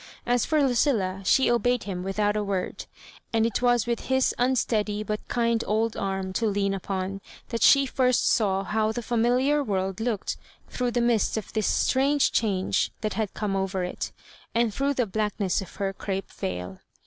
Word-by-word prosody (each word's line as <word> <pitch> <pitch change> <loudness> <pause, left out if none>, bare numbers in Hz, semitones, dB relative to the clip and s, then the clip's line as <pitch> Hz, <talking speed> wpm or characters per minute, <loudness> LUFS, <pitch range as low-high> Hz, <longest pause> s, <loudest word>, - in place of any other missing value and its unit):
As 245 -1 +2
for 310 -1 +2
Lucilla^ 230 -8 +1
she 265 - +4
obeyed 245 +1 +1
him 185 -3 -4
without 205 +2 0
a 210 - 0
word; 195 -2 -3 0.4
and 225 -1 +2
it 230 0 -1
was 245 -2 +3
with 235 -1 -1
his 260 0 +2
unsteady 220 -4 +1
but 210 0 -2
kind 235 -1 +1
old 220 +1 +1
arm 190 -1 -3
to 225 +4 0
lean 200 -1 0
upon 195 0 -3 0.3
that 230 -2 -3
she 275 +4 +6
first 255 -2 +2
saw 195 -3 +2
how 215 +2 0
the 235 +2 -4
familiar, 250 +6 +2
world 190 -4 -2
looked 225 -3 -2 0.3
through 250 -1 -2
the 240 0 0
mist 235 -3 +2
of 220 - -6
tiiis 215 -2 0
strange 275 +2 +2
change 195 -4 +1
that 215 -1 -2
had 210 -1 -3
come 205 -2 -2
over 190 -1 -1
it, 180 - -4 0.4
and 230 -2 +2
through 280 +4 0
the 250 - +1
blackness 210 -2 -1
of 190 - -10
her 195 -1 -2
crape 195 0 -4
veil. 90 0 -5
215 Hz, 180 wpm, -26 LUFS, 195-240 Hz, 0.4 s, she